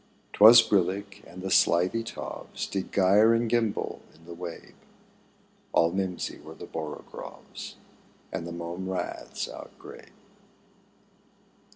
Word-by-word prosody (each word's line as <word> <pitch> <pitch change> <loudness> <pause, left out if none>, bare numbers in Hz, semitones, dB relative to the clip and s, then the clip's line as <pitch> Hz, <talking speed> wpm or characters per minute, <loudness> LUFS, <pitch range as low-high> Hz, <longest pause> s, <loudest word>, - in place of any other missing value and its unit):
'Twas 115 +3 +9
brillig, 100 +1 0
and 90 +1 -10
the 95 - -3
slithy 90 +8 +3
toves 115 - -6
Did 95 -2 -4
gyre 105 +4 +5
and 115 0 +1
gimble 115 -2 -1
in 80 - -20
the 85 - -9
wabe; 85 -1 -8 1.0
All 85 0 +4
mimsy 95 -1 -3
were - - -11
the - - -9
borogoves 80 -2 -8 0.6
And 85 - -4
the - - -6
mome 85 +2 -5
raths 95 - -4
outgrabe. - - -11
95 Hz, 115 wpm, -27 LUFS, 85-105 Hz, 1.0 s, Twas